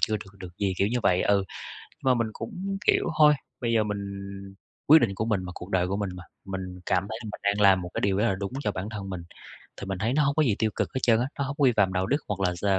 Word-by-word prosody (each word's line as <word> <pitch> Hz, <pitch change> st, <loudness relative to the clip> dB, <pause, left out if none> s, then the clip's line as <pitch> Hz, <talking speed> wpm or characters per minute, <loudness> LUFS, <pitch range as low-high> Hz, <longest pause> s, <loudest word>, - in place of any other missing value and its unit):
chưa 110 Hz, -, +2 dB
được 100 Hz, -1 st, -12 dB
được 90 Hz, -2 st, -10 dB
gì, 100 Hz, -2 st, +1 dB
kiểu 100 Hz, -, +3 dB
như 120 Hz, +2 st, 0 dB
vậy, 90 Hz, -2 st, +3 dB
ừ. 100 Hz, -1 st, +3 dB, 0.5 s
Nhưng -, -, -30 dB
mà -, -, +5 dB
mình 115 Hz, -2 st, 0 dB
cũng, 195 Hz, -2 st, -5 dB
kiểu, -, -, +4 dB
thôi, 150 Hz, -1 st, +8 dB, 0.3 s
bây 115 Hz, -1 st, 0 dB
giờ 110 Hz, -, +4 dB
mình 105 Hz, -1 st, -2 dB, 0.9 s
quyết 160 Hz, +2 st, +9 dB
định 100 Hz, -5 st, +1 dB
của 110 Hz, -, -1 dB
mình 105 Hz, -5 st, 0 dB
mà, 90 Hz, -, -6 dB
cuộc 90 Hz, -, -8 dB
đời 90 Hz, -2 st, +1 dB
của 100 Hz, +2 st, -1 dB
mình 100 Hz, -2 st, -2 dB
mà. 90 Hz, -, -9 dB, 0.2 s
Mình 95 Hz, -1 st, -6 dB
cảm 90 Hz, 0 st, +1 dB
thấy 110 Hz, -, -4 dB
là -, -, -7 dB
mình -, -, -9 dB
đang 100 Hz, +1 st, +1 dB
làm 95 Hz, -2 st, +6 dB
một 90 Hz, -, -6 dB
cái -, -, -2 dB
điều 100 Hz, -1 st, +1 dB
rất 105 Hz, -, +2 dB
là 100 Hz, -5 st, +2 dB
đúng 100 Hz, +4 st, -4 dB
cho 105 Hz, -, 0 dB
bản 95 Hz, +2 st, -5 dB
thân 100 Hz, -3 st, -6 dB
mình, 90 Hz, -3 st, -5 dB, 0.6 s
thì -, -, -4 dB
mình 95 Hz, -1 st, -2 dB
thấy 115 Hz, +3 st, 0 dB
nó 150 Hz, +1 st, +3 dB
hông 140 Hz, +1 st, +1 dB
có 155 Hz, -, +4 dB
gì 110 Hz, -7 st, +2 dB
tiêu 110 Hz, -1 st, +1 dB
cực -, -, -1 dB
hết 130 Hz, -, +1 dB
trơn 115 Hz, -2 st, +5 dB
á, 125 Hz, -, 0 dB
nó 140 Hz, -, +2 dB
hông 140 Hz, +1 st, -4 dB
có -, -, +3 dB
vi 130 Hz, -, +6 dB
phạm 95 Hz, -2 st, +3 dB
đạo 95 Hz, 0 st, +1 dB
đức 145 Hz, -, +2 dB
hoặc 100 Hz, -1 st, -3 dB
là 90 Hz, -2 st, +1 dB
d 95 Hz, -, -6 dB
100 Hz, 310 wpm, -27 LUFS, 95-115 Hz, 0.9 s, quyết